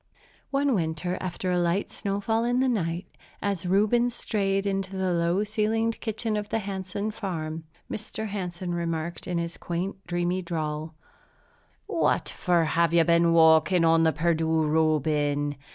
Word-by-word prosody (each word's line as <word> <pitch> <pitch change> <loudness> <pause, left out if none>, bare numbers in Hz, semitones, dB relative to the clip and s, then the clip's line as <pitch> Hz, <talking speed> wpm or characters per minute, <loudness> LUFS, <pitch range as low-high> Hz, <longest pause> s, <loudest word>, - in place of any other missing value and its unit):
One 280 0 +1
winter, 175 -1 -1
after 185 0 -3
a 180 - +2
light 175 +3 0
snowfall 205 +3 -1
in 245 +1 +1
the 260 - +3
night, 180 -7 -1 0.3
as 195 -4 -2
Reuben 215 +6 +3
strayed 195 -4 -1
into 195 -1 -2
the 185 -1 0
low 170 +3 +1
ceilinged 220 +1 0
kitchen 220 -1 -2
of 210 0 -3
the - - 0
Hansen 200 0 -3
farm 160 -6 -4 0.2
house, 215 0 -6
Mr. 220 0 -3
Hansen 180 -3 -4
remarked 170 -1 -3
in 180 -2 -1
his 170 0 -3
quaint, 180 +3 -3
dreamy 175 +1 0
drawl, 155 -2 -4 0.9
"What - - +1
for 175 -3 +1
have 170 +1 +2
you 170 - +6
been 170 0 +4
walking 165 +1 +5
on 165 0 +5
the 160 -1 +4
Perdu, 160 0 +1
Reuben? 150 -2 +1
180 Hz, 150 wpm, -26 LUFS, 165-205 Hz, 0.9 s, you